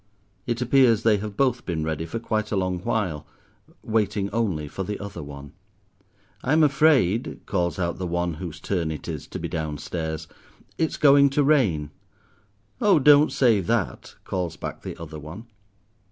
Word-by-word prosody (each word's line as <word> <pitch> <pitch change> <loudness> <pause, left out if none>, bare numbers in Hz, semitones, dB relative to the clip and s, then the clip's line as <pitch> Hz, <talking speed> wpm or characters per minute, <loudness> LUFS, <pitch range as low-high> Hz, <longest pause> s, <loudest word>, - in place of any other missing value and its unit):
It 120 +1 -1
appears 125 -3 +4
they 110 -2 +4
have 105 0 -6
both 125 -3 +1
been 80 -4 -2
ready 80 +1 -3
for 115 - -4
quite 110 -2 -2
a - - 0
long 90 -2 -1
while, 90 -6 -2 0.6
waiting 105 -2 0
only 100 -10 -1
for 85 - -6
the 100 +2 -3
other 100 -1 -7
one. 70 -1 -10 0.9
"I'm 155 +5 +3
afraid," 140 - +3
calls 85 -4 -1
out 85 -1 -2
the 90 - -2
one 85 0 -1
whose 85 0 -7
turn 85 -2 -2
it 75 -2 -6
is - - -5
to - - -6
be - - -4
down 80 -2 -3
stairs, 80 0 -4 0.5
"it's 160 - 0
going 140 -1 +6
to 145 +2 +1
rain." 100 - +2 0.9
"Oh, 200 -4 +5
don't 145 +1 +6
say 120 -6 +3
that," 110 +1 -2
calls 90 -4 -3
back - - -6
the - - -7
other 80 -1 -8
one. 80 +10 -9
100 Hz, 170 wpm, -24 LUFS, 80-120 Hz, 0.9 s, going